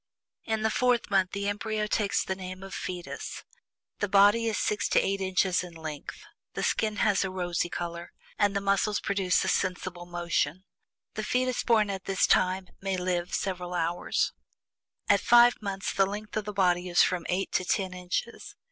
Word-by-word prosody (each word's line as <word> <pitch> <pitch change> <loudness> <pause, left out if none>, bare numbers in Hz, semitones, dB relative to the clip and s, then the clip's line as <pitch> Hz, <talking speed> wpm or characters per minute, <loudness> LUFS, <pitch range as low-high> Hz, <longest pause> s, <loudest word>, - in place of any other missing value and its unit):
"At 220 -1 -1
the 220 - +2
FOURTH 245 -3 +1
MONTH, 190 -2 +3
the 200 0 -2
embryo 210 +1 -1
takes 210 0 0
the 190 - -2
name 185 0 -8
of 195 - -9
'fetus.' 180 -1 -6 0.6
The 205 - -1
body 205 +4 +5
is 220 - 0
six 210 -2 0
to - - +4
eight 195 0 -1
inches 185 -1 +1
in 175 -2 -10
length. 155 -3 -7 0.3
The - - -2
skin 215 -1 0
has 205 -1 +2
a 190 - -2
rosy 175 -2 -2
color, 170 0 -5 0.3
and 205 -1 +2
the 200 - +1
muscles 200 +1 +1
produce 195 -2 +1
a - - -2
sensible 180 -1 -2
motion. 175 -1 -1 0.5
A - - 0
fetus 250 +3 0
born 215 -3 +3
at 190 -1 -6
this 195 -1 +2
time 185 0 +2
might 195 -1 -1
live 180 -1 -1
several 180 -2 -3
hours. 170 +1 0 0.7
At 200 - +5
FIVE 240 0 +6
MONTHS 195 -1 -3
the 195 -1 +3
length 210 +2 -6
of 215 -1 -1
the 210 - -4
body 180 -2 +1
is 175 - +5
from 180 -2 -1
eight 185 +2 -1
to - - +1
ten 185 0 -1
inches. 180 +6 -4
195 Hz, 185 wpm, -28 LUFS, 180-210 Hz, 0.7 s, FIVE